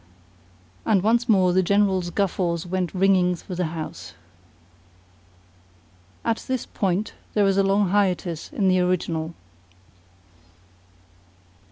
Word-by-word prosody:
And 200 -4 +2
once 235 +3 +2
more 185 -4 +4
the 185 - +4
General's 190 -1 +1
guffaws 175 -3 -1
went 180 -1 -2
ringing 185 -1 +3
through 180 +1 -8
the 180 -2 0
house. 155 - -7 2.1
[At 230 -1 +1
this 260 -2 -2
point 195 +2 -2 0.2
there 205 -1 +4
is 195 -1 +2
a - - +5
long 195 0 +2
hiatus 185 - 0
in 215 -10 0
the 185 0 +3
original. 170 -2 -1
185 Hz, 115 wpm, -23 LUFS, 180-200 Hz, 2.1 s, a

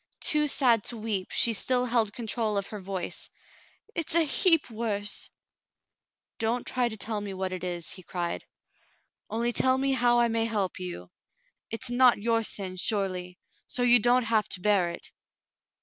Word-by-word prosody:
Too 300 -1 +3
sad 240 -6 +3
to 240 - -2
weep, 210 -4 -3
she 230 - +3
still 250 +3 0
held 230 -4 +1
control 220 -1 -2
of 200 - -1
her 210 - -7
voice. 190 -2 -5 0.6
"It's 330 0 0
a 335 - +8
heap 330 +1 +4
worse 210 -2 -1 0.4
— - - -61
" - - -65
"Don't 230 +2 -1
try 250 -2 +1
to 220 - -8
tell 215 0 -3
me 200 -2 -6
what 185 0 -3
it 185 - -6
is," 175 -2 -4
he 185 - -8
cried. 175 -1 -4 0.9
"Only 235 +2 -1
tell 260 +2 +3
me 270 +1 0
how 240 -2 +3
I 240 - +3
may 225 0 0
help 205 -6 -2
you. 175 - -7 0.6
It's 225 +2 -3
not 250 0 +5
your 230 +2 0
sin, 190 -4 -3
surely, 185 -3 -2 0.3
so 245 - -1
you 245 0 +6
don't 245 +3 +3
have 220 -2 0
to 185 - 0
bear 190 -2 +2
it." 170 - -9
225 Hz, 180 wpm, -27 LUFS, 195-245 Hz, 0.9 s, a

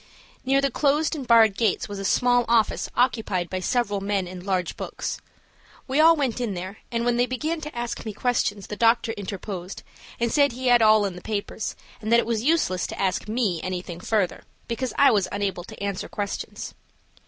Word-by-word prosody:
Near 270 +1 +3
the 275 -1 +1
closed 300 +3 +1
and 275 -5 -6
barred 225 -4 +6
gates 220 -3 +1
was 205 -1 -6
a 195 - -4
small 245 +3 +3
office 230 -1 +2
occupied 220 -8 0
by 185 - -1
several 205 0 0
men 195 -2 -1
and 180 0 -8
large 185 -3 -1
books. - - -5 0.7
We 270 +3 0
all 325 +1 +7
went 260 -5 -1
in 220 -5 -2
there, 185 +4 -6
and 235 0 -1
when 240 0 +2
they 245 +1 +2
began 310 +6 -2
to 300 -4 -7
ask 240 0 -3
me 220 - -4
questions 210 -3 -1
the 210 - -6
doctor 230 +1 +3
interposed 195 -3 -6 0.4
and 235 -1 0
said 285 -3 +3
he 255 +1 -1
had 240 -1 +6
all 215 -1 +6
the 180 -2 -7
papers, 210 +1 -4 0.3
and 220 +1 -3
that 235 - +7
it - - 0
was 230 -2 -1
useless 280 - +1
to - - -8
ask 190 +1 0
me 210 -7 0
anything 180 -2 -5
further, 200 -1 -1 0.2
because 245 +2 -2
I 280 - +6
was 205 -5 +2
unable 200 -3 -2
to - - -11
answer 200 -2 -3
questions. 205 -1 -5
220 Hz, 200 wpm, -25 LUFS, 195-245 Hz, 0.7 s, all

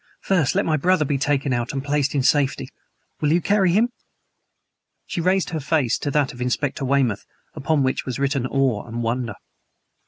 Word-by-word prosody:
"First 170 -9 +1
let - - +2
my 155 -1 +1
brother 170 +1 +2
be 140 -1 -1
taken 140 -1 0
out 120 0 -1
and 135 -1 -3
placed 145 -1 0
in 135 - +1
safety. 140 0 +1 0.5
Will 150 -1 +2
you 170 - +4
carry 195 0 +2
him?" 220 +7 +3 1.2
She 170 - -3
raised 185 0 +1
her 160 - -2
face 140 -4 0
to - - -2
that 145 -2 +1
of 120 - -10
Inspector 130 +3 -1
Weymouth, 130 -6 +1 0.3
upon 145 0 0
which 130 - 0
was 130 - -4
written 135 -2 0
awe 130 -5 0
and 120 +1 -4
wonder. 120 +1 -2
140 Hz, 185 wpm, -22 LUFS, 130-155 Hz, 1.2 s, you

